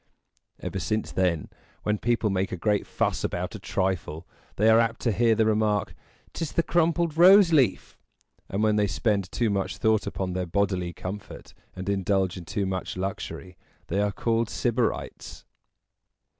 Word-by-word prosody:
Ever - - -4
since 110 0 -2
then, 90 -5 0 0.4
when 105 0 0
people 115 -3 +1
make 95 0 -1
a 90 - -3
great 105 +4 0
fuss - - -1
about - - -3
a - - -7
trifle, 90 -4 -2 0.3
they 110 - +2
are 110 0 +7
apt 115 0 +1
to 115 - +1
hear 115 +2 +3
the 110 0 +2
remark, 105 -2 +1 0.4
"'Tis 165 - -4
the 170 - +2
crumpled 170 -1 +1
rose 185 0 +7
leaf!" 130 -10 +1 0.5
and 100 +3 -1
when 105 -1 +3
they 105 -1 +2
spend 100 -2 -1
too 115 -3 0
much 100 0 -2
thought 110 0 +1
upon 95 -2 -3
their 90 -1 -2
bodily 95 -1 0
comfort, 95 +3 -8 0.2
and 95 0 -6
indulge 95 -1 0
in 90 -3 -8
too 100 +4 -2
much 95 -1 -4
luxury, 95 -1 -5 0.3
they 100 +4 +1
are 105 0 +1
called 115 +2 0
Sybarites. 120 -1 -2
105 Hz, 165 wpm, -26 LUFS, 95-115 Hz, 0.5 s, are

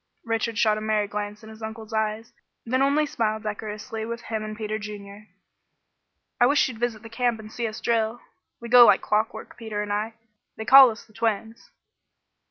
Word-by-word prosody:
Richard 225 -1 -1
shot 215 -1 +3
a - - -8
merry 215 -1 0
glance 210 +1 -5
in 220 - -11
his 220 +1 -14
uncle's 220 0 -7
eyes, 220 +1 -2 0.3
then 255 +3 0
only 285 +3 +3
smiled 220 -5 -2
decorously 215 +1 -5
with 235 +1 -4
him 220 -2 -3
and 215 0 -6
Peter 215 0 -3
Junior. 205 0 -9 1.1
"I 245 - +6
wish 285 +2 +3
you'd 240 -4 -8
visit 235 -2 -2
the - - -8
camp 230 0 -1
and 215 0 -10
see 235 0 -2
us 215 +1 -6
drill. 230 0 0 0.4
We 235 - -8
go 245 +1 +9
like - - +5
clockwork, 215 +1 -2
Peter 215 -3 -4
and 205 0 -3
I. 215 +2 -2 0.4
They 220 - -5
call 265 +1 +9
us 220 -2 -8
the 215 - -24
twins." 225 0 -3
220 Hz, 190 wpm, -25 LUFS, 215-230 Hz, 1.1 s, go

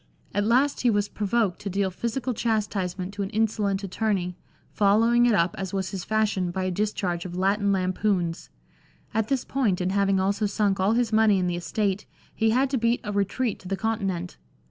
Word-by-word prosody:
At 205 0 +1
last 265 +5 +2
he 245 - +3
was 205 -2 +1
provoked 210 -2 0
to 200 - -5
deal 195 0 0
physical 235 +6 -2
chastisement 200 -5 -2
to 205 - -5
an 195 - -2
insolent 210 -2 0
attorney, 195 -2 -1 0.4
following 230 +4 +4
it 230 - +4
up, 170 0 +2
as 190 -1 -4
was 190 -1 -2
his 190 -2 -4
fashion, 215 -4 0
by 185 +2 -3
a 185 - -1
discharge 180 -3 -1
of 180 -1 -7
Latin 200 +2 +2
lampoons. 185 -2 0 0.6
At 220 -1 0
this 270 -2 -1
point, 230 -9 0
and 180 0 0
having 195 -1 +2
also 200 +3 +1
sunk 200 -1 0
all 195 +3 +3
his 235 -2 +1
money 215 -2 +5
in 185 - 0
the 175 -1 -1
estate, 195 +3 -2 0.3
he 225 0 +1
had 260 +4 +2
to 265 - +1
beat 235 +1 +1
a 210 - -4
retreat 205 +4 -1
to 185 - -11
the 195 +1 -2
Continent. 195 -6 -2
200 Hz, 195 wpm, -25 LUFS, 190-220 Hz, 0.6 s, money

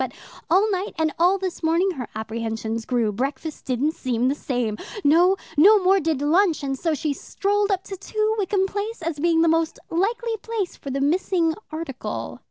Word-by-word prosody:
But 260 -1 -3 0.4
all 395 +5 +4
night, 385 +2 -2
and 315 -2 +1
all 360 +3 +4
this 375 -2 -4
morning 335 +4 +2
her 255 -9 -5
apprehensions 225 0 -3
grew. 235 -4 +1
Breakfast 270 +7 -4
didn't 265 +4 +1
seem 250 -4 -1
the - - +2
same 245 -7 -2 0.2
no, 350 +6 +5 0.2
no 405 +8 +8
more 385 0 +4
did 315 -4 -1
lunch, 330 +1 +3
and 270 -1 -1
so 320 +3 -1
she 295 +1 -1
strolled 405 +8 -1
up 380 -2 0
to 390 - -7
2, 430 +3 -1
Wickham 385 -1 +1
Place 405 0 -4
as 320 -2 -3
being 330 +1 +3
the - - +3
most 325 0 +1
likely 450 +6 0
place 430 -3 -3
for 275 - -8
the 275 +1 -2
missing 335 +2 +2 0.2
article." 310 -5 -5
330 Hz, 185 wpm, -23 LUFS, 270-385 Hz, 0.4 s, no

